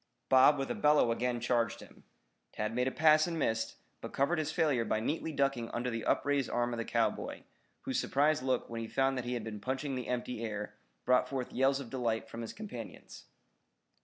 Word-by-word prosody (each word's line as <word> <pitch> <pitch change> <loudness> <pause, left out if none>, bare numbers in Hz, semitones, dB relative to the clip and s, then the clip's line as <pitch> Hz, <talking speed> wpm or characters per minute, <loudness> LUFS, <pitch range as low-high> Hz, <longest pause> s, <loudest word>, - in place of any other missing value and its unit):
Bob 130 +3 +7
with 135 -1 -2
a - - +1
bellow 150 -5 +4
again 120 +1 -1
charged 115 -2 0
him. - - -15 0.5
Tad 105 +1 -2
made 125 +2 +1
a - - 0
pass 155 +1 +5
and 170 -1 -3
missed, 115 -7 -1 0.3
but - - -6
covered 150 +5 +1
his 155 0 -1
failure 150 -8 +2
by 110 -1 0
neatly 160 +7 -2
ducking 135 -5 0
under 125 +1 -2
the 115 -1 -4
upraised 140 -3 +1
arm 120 0 0
of 120 - -3
the - - 0
cowboy, - - -1 0.4
whose - - -1
surprised 150 +2 +2
look 130 -1 0
when 115 0 -5
he 115 - -4
found 135 +3 +1
that 125 -2 -3
he 125 0 -2
had 120 - -3
been 110 -1 -6
punching 130 +4 -2
the 125 -2 -4
empty 125 -1 -3
air 105 -2 -4 0.3
brought 125 0 +3
forth 130 -3 -4
yells 135 +1 +2
of 130 -5 -8
delight 115 -4 -1
from 115 +1 -7
his 115 - -5
companions. 215 +1 -9
125 Hz, 210 wpm, -32 LUFS, 115-140 Hz, 0.5 s, Bob